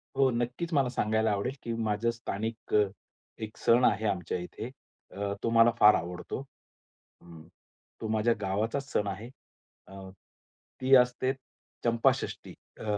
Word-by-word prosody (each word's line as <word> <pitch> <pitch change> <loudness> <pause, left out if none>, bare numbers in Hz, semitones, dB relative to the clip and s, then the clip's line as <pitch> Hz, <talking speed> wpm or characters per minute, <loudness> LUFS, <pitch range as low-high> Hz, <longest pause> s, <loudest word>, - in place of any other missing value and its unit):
हो, 135 -1 +4
नक्कीच 125 +8 -2
मला 135 -4 +3
सांगायला 110 -2 +1
आवडेल, 105 +6 -1
की 115 - -3
माझं 110 0 0
स्थानिक 115 -1 -5 0.7
एक 110 0 -7
सण 120 +2 +4
आहे 105 +2 +2
आमच्या 90 -3 -1
इथे 90 +6 -7 0.4
अ, 100 +1 -3
तो - - +1
मला 115 0 +6
फार 105 0 +8
आवडतो. 90 +6 -4 0.8
हं. 85 -2 -13 0.6
तो 110 - -3
माझ्या 110 +2 +2
गावाचाच 110 +8 -2
सण 105 - +1
आहे. 100 +4 -5 0.6
अं, 95 0 -10 0.7
ती 130 +1 +2
असते 125 +1 +3 0.5
चंपाषष्ठी 115 -1 +1 0.3
अ, - - -7
110 Hz, 135 wpm, -29 LUFS, 100-120 Hz, 0.8 s, फार